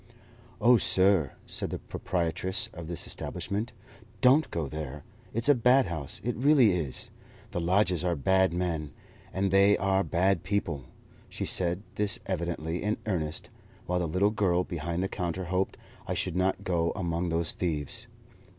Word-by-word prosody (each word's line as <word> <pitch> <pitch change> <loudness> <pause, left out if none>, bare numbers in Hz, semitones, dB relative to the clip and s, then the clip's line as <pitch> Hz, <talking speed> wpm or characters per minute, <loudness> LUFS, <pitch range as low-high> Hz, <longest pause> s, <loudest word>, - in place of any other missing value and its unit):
"Oh, 120 +2 +6
sir," 95 - +4
said - - 0
the - - -3
proprietress 90 +1 -1
of 85 -2 -8
this 85 0 -1
establishment, 105 +4 -3 0.5
"don't 135 +5 +4
go 80 -4 -3
there! 75 -2 -6 0.3
It's 115 +3 +1
a 145 - +7
bad 125 +1 +4
house; 80 -6 -4
it 120 +2 -1
really 130 -3 +5
is! 80 -8 -3 0.4
The 90 - -2
lodgers 90 0 +2
are 90 -1 +1
bad 95 +5 +2
men, 85 -5 -2 0.4
and 95 0 -1
they 100 +1 +5
are 95 0 +1
bad 95 +2 +1
people." 90 -8 -2 0.4
She - - -4
said 90 +1 +2
this 105 -1 +2
evidently 85 -2 -3
in 105 +1 -1
earnest, 80 -6 -2 0.3
while 90 0 0
the 85 - -1
little 95 +6 +2
girl 90 -4 +1
behind 85 0 -3
the - - 0
counter 90 -1 -3
hoped 95 +2 -1 0.3
I - - -2
should - - -1
not 95 +1 0
go 85 -2 0
among 85 -2 -2
those 85 -1 0
thieves. 75 -5 -2
90 Hz, 160 wpm, -28 LUFS, 85-100 Hz, 0.5 s, a